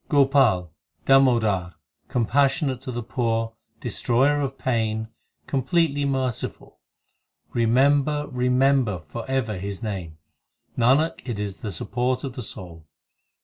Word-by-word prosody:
Gopal, 135 - +3 0.3
Damodar, 110 - +3 0.3
compassionate 135 +2 +1
to 130 - -5
the 120 0 -4
poor, 115 -1 -1 0.3
Destroyer 140 +5 +1
of 135 -1 -3
pain, 110 -3 -1 0.4
completely 145 +2 +1
merciful 130 -4 -3 0.7
Remember, 140 +5 +2
remember 125 -3 +2
for 75 - -8
ever 110 -7 -1
His 100 +3 -5
name; 90 -7 -5 0.6
Nanak, 135 +7 +2
it 120 -4 -4
is 100 -2 -4
the 110 - -5
support 125 +7 -2
of 135 -3 -4
the 125 - -6
soul. 85 -7 -8
125 Hz, 110 wpm, -24 LUFS, 110-135 Hz, 0.7 s, Gopal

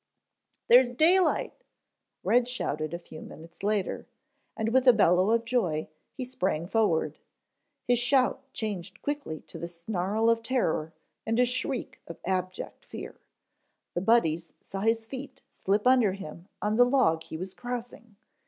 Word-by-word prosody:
"There's 245 0 +6
daylight," 355 +6 +3 0.7
Red 245 0 +3
shouted 155 - -3
a 170 - -3
few 160 -2 -12
minutes 165 +1 -12
later, 205 -1 -1 0.5
and 220 0 0
with 260 +2 +2
a 250 - +10
bellow 185 -2 +4
of 230 +1 +2
joy, 185 -11 0 0.2
he 260 - -6
sprang 185 -10 -1
forward. 175 -7 +1 0.7
His 245 -1 +3
shout 255 +2 +2
changed 195 -6 -5
quickly 285 - -3
to - - -10
the 170 - -4
snarl 185 +5 -1
of 230 0 +3
terror, 225 -10 0 0.3
and 225 +2 0
a 250 - +6
shriek 255 +1 -3
of 170 - -8
abject 185 0 -3
fear. - - -8 0.8
The 175 - -1
Buddies 170 -7 +2
saw 195 - -7
his 225 +2 +1
feet 260 +2 -8
slip 205 +2 0
from 255 - +6
under 235 -7 +4
him 175 -2 -9 0.2
on 210 +1 +1
the 245 - +7
log 245 -11 +3
he 160 - -7
was 185 +2 -5
crossing. 240 -2 -7
220 Hz, 155 wpm, -28 LUFS, 175-245 Hz, 0.8 s, a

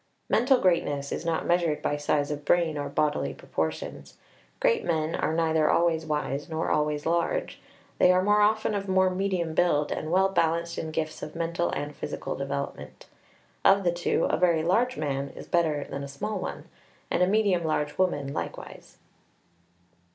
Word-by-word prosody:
Mental 250 +3 +4
greatness 145 -7 +1
is 170 - -4
not 165 -1 0
measured 170 -3 +1
by 145 - 0
size 145 0 0
of 145 0 -4
brain 165 0 +2
or 145 -1 -3
bodily 150 -1 0
proportions. - - -4 0.4
Great - - +2
men 160 -1 0
are 160 - -1
neither 160 -2 +2
always 165 -2 +2
wise 150 0 -2
nor 160 0 -2
always 150 -1 0
large; 170 - -1 0.4
they 180 - +6
are 185 0 +3
more 210 +1 +4
often 215 +1 +2
of 200 -1 -3
more 190 0 +3
medium 185 -3 -1
build, 150 -4 +2
and 155 - -3
well 190 +2 +4
balanced 170 -2 0
in 160 - -4
gifts 155 0 -3
of 155 - -7
mental 170 +1 -1
and 145 0 -4
physical - - -5
development. 140 0 -5 0.6
Of 195 0 +5
the 175 - +3
two, 175 0 0
a - - +1
very 170 -3 +3
large 235 +9 +1
man 140 -2 -2
is - - -9
better 155 -4 +1
than 140 - -5
a - - -5
small 140 +10 -4
one, - - -6 0.4
and - - +1
a 180 - +5
medium 200 -4 +2
large 150 -1 -1
woman 145 -7 0
likewise. - - -7
165 Hz, 175 wpm, -27 LUFS, 150-185 Hz, 0.6 s, they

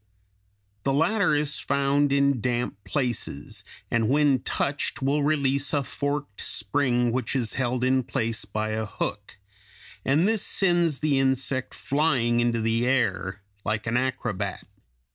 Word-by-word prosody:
The 135 - +1
latter 200 +3 +2
is 150 0 0
found 140 +1 +1
in 140 -3 +2
damp 120 -3 -2
places, 120 - -2 0.3
and 115 -1 +2
when 145 -1 +3
touched 140 +3 -1
will 140 +2 +2
release 140 -1 +1
a 145 -2 +2
forked 145 -4 -3
spring 120 +2 +1
which 125 +1 -2
is 120 -4 0
held 125 -1 -1
in 130 0 +3
place 115 -3 -1
by 110 0 -3
a 110 0 -2
hook, 105 -1 -5 0.7
and 150 +8 +3
this 220 -2 +2
sends 175 -6 +2
the 145 -3 +2
insect 130 0 0
flying 130 -5 +1
into 120 -1 +1
the 115 +2 +1
air 100 -7 0 0.2
like 110 +1 -2
an 115 +1 -1
acrobat. 120 -6 -2
130 Hz, 140 wpm, -26 LUFS, 115-145 Hz, 0.7 s, when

